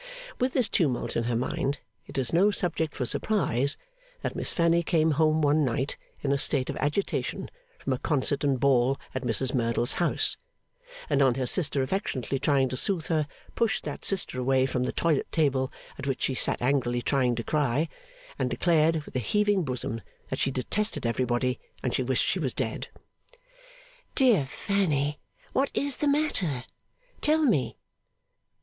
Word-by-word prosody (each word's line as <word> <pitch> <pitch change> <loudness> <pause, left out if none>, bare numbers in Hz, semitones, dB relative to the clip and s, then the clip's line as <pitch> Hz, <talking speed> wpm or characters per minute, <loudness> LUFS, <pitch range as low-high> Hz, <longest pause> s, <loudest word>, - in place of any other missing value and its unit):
With 255 +1 +1
this 250 -5 +3
tumult 135 - 0
in 115 - 0
her 120 0 0
mind, 135 +3 -1 0.3
it - - -8
is 130 +1 0
no 190 +5 +5
subject 165 -6 -1
for 125 - -2
surprise 140 - +1 0.5
that - - -2
Miss - - +2
Fanny 170 0 +3
came 160 -2 +2
home 155 +1 +2
one 150 +1 +4
night 130 +2 0 0.3
in 140 - +1
a 140 - +2
state 130 -1 +1
of - - -7
agitation 150 +7 -2 0.3
from - - -2
a - - -3
concert 145 -2 0
and 140 -3 +2
ball 135 0 +3 0.2
at 130 - -2
Mrs 125 +2 +2
Merdle's 120 -1 +1
house, 175 - +1 0.7
and 140 - +2
on 130 -3 +4
her 130 -1 -1
sister 140 -1 +2
affectionately 135 - -2
trying 135 -1 +3
to 130 - -4
soothe 170 +2 -1
her, 155 -3 +1 0.3
pushed 230 -2 0
that - - -6
sister 190 -9 0
away 130 +1 +3
from 130 -1 -1
the - - -1
toilette 160 -4 0
table 135 -4 +1 0.3
at - - -5
which 135 - -1
she 135 - +1
sat 125 - -1
angrily 120 -2 +1
trying 125 -3 +2
to 115 - -3
cry, 150 +2 +1 0.5
and 130 -1 +1
declared 160 +4 +2
with - - -13
a - - +2
heaving 205 - +2
bosom 125 -5 -3 0.3
that - - -3
she - - +2
detested 135 - -1
everybody, 125 +1 0 0.2
and 125 - -1
she - - +1
wished 130 0 +1
she 190 - 0
was 135 -7 -2
dead. 115 -4 -3 1.3
'Dear 235 - +4
Fanny, 150 -5 0 0.3
what 275 +1 +2
is 280 -2 0
the 295 - 0
matter? 220 - +1 0.6
Tell 310 +1 +3
me. 135 - +1
140 Hz, 170 wpm, -27 LUFS, 130-170 Hz, 1.3 s, no